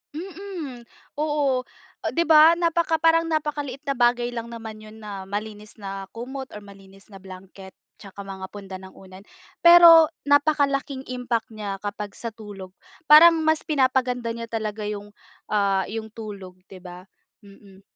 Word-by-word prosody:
Mm. 335 -9 -8 0.3
Oo. 290 -4 0 0.5
'Di 335 - +2
ba 320 +1 +7
napaka 335 -1 +1
parang 330 0 +3
napakaliit 295 -3 -3
na 275 -2 -2
bagay 240 0 +2
lang 235 -1 -6
naman 225 -2 -9
yun 215 0 -13
na 195 -2 -7
malinis 210 +1 -7
na 195 -2 -7
kumot 265 +3 -7
or 210 - -9
malinis 195 0 -17
na 195 - -11
blanket 190 0 -13 0.2
tsaka 200 0 -11
mga 195 -1 -8
punda 195 -2 -8
ng 190 0 -13
unan. 190 +1 -15 0.4
Pero 340 -1 +9 0.2
napakalaking 285 -2 +1
impact 245 -2 -3
niya 205 -3 -6
kapag 205 0 -6
sa 230 - -6
tulog. 205 -4 -10 0.4
Parang 330 +3 +9
mas 315 +1 +1
pinapaganda 255 -5 0
niya 230 0 -5
talaga 220 -2 -4
yung, 205 0 -6 0.4
ah 200 -2 +1
yung 220 0 -5
tulog, 200 -5 -9
'di 190 - -11
ba? 180 0 -11 0.4
Mm. 200 -1 -17
230 Hz, 145 wpm, -23 LUFS, 200-285 Hz, 0.5 s, Pero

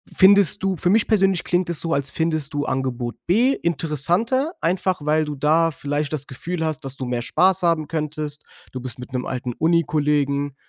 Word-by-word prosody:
findest 200 0 +5
du 190 -1 +1
für 175 - 0
mich 215 +2 +3
persönlich 195 -5 +2
klingt 175 0 0
es 170 - -1
so, 165 -1 -1
als 140 -1 0
findest 155 -3 -2
du 145 0 -1
Angebot 125 -2 -3
B 240 +9 +3
interessanter. 170 - 0
Einfach, 180 0 0
weil 155 +1 +2
du 150 -1 -5
da 160 +4 +2
vielleicht 145 +2 -3
das 145 -2 -2
Gefühl 165 +4 -4
hast, 155 -3 -3
dass 135 0 -1
du 130 - -4
mehr 120 -1 -2
Spaß 185 +8 +2
haben 165 -3 +1
könntest. 150 -2 -4 0.3
Du 130 - -6
bist 125 0 -6
mit 125 +1 -10
'nem 125 - -2
alten 125 -1 -4
Unikollegen. 145 -3 +1
155 Hz, 190 wpm, -22 LUFS, 140-175 Hz, 0.3 s, findest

